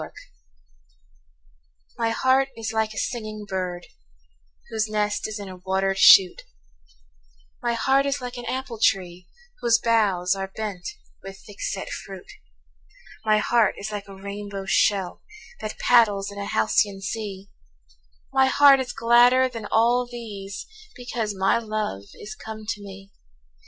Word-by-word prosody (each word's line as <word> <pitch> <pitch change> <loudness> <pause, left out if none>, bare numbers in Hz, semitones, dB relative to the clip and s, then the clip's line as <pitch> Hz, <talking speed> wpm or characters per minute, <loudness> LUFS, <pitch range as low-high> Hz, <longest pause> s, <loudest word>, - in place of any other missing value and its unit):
A - - -3
BIRTHDAY. - - -11 1.8
My 230 -1 +1
heart 260 +3 +2
is 225 -1 -4
like 220 -1 0
a - - -10
singing 215 -3 -4
bird 180 -2 -4 0.9
Whose 220 -1 0
nest 210 -1 -1
is 215 0 -5
in 200 -1 -7
a 185 -1 -9
watered 190 +1 -1
shoot; 185 -2 +7 1.2
My 240 -1 0
heart 270 +4 +2
is 280 +1 -1
like 250 -1 -6
an 245 - -7
apple 255 -3 -4
tree 180 -3 0 0.3
Whose 235 -1 +3
boughs 205 -6 +2
are 195 0 -4
bent 205 -5 -5 0.3
with 195 0 -9
thick 205 -2 -13
set 195 - -3
fruit; 195 -2 -8 0.9
My 215 -1 +4
heart 225 -1 +2
is 210 +2 -5
like 205 -1 -6
a 195 - -11
rainbow 200 0 -7
shell 195 -1 +1 0.4
That 215 -1 -6
paddles 205 -5 +3
in 200 - -8
a 200 - -4
halcyon 195 - +1
sea; 200 -1 -6 0.8
My 265 0 +4
heart 275 +1 +6
is 260 - -4
gladder 245 +2 +5
than 230 -4 -7
all 240 +2 +3
these 210 -5 -8 0.3
Because 235 -4 -4
my 195 +4 +2
love 215 - -4
is 215 - -9
come 220 0 -9
to 220 -2 -3
me. 195 0 -11
215 Hz, 145 wpm, -24 LUFS, 195-235 Hz, 1.8 s, shoot